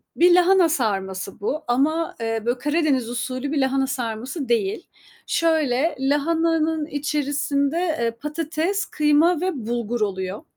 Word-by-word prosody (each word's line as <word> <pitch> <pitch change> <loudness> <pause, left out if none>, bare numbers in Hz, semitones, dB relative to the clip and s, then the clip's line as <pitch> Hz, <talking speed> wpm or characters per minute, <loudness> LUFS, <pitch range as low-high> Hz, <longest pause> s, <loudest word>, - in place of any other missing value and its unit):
bir 350 +1 +6
lahana 360 -1 +5
sarması 195 - -2
bu 280 +9 -2
ama, 300 +7 +1
eee, 225 0 -1
böyle 240 +2 0
Karadeniz 295 -5 +1
usulü 255 +3 -3
bir 305 - -1
lahana 265 0 +1
sarması 255 +2 -4
değil. 225 - 0 0.4
Şöyle, 315 -2 +1
lahananın 320 +3 +1
içerisinde, 290 0 -1 0.2
eee, 230 -1 +1
patates, 315 - -2
kıyma 305 +3 +2
ve 370 - +1 0.2
bulgur 235 -1 -2
oluyor. 190 -1 -2
280 Hz, 125 wpm, -23 LUFS, 240-320 Hz, 0.4 s, bir